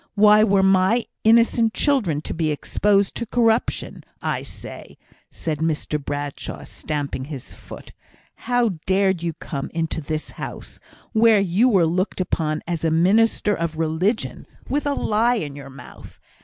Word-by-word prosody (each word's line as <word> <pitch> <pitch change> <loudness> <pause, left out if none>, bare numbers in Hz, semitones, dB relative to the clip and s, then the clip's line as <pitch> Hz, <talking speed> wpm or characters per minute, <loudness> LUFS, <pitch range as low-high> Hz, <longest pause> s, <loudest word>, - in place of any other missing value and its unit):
Why 210 +1 +6
were 195 -2 +3
my 190 +5 +3 0.2
innocent 230 0 +4
children 215 - +1
to - - -5
be 160 -1 -1
exposed 200 +6 +1
to 235 - -4
corruption? 230 0 0 0.2
I - - -2
say," - - -10 0.3
said 155 -3 -4
Mr 155 -2 -2
Bradshaw, 145 0 -5
stamping 145 -4 -4
his 140 -4 -8
foot, - - -12 0.6
"how 235 -8 +1
dared 190 -2 +2
you 170 -1 -2
come 140 -2 -6
into 160 -1 -2
this 155 +1 -4
house, - - -8 0.3
where 220 -1 +5
you 195 +6 +3
were 190 -7 +4
looked 185 +5 -1
upon 155 -4 -1
as 170 -2 -3
a 165 - +2
minister 205 +6 +3
of 165 -3 -3
religion, 165 +8 -1 0.2
with 290 +1 -1
a 285 - 0
lie 230 +3 +1
in 150 -10 -4
your 140 -1 -9
mouth? 135 +1 -13
185 Hz, 150 wpm, -22 LUFS, 155-220 Hz, 0.6 s, Why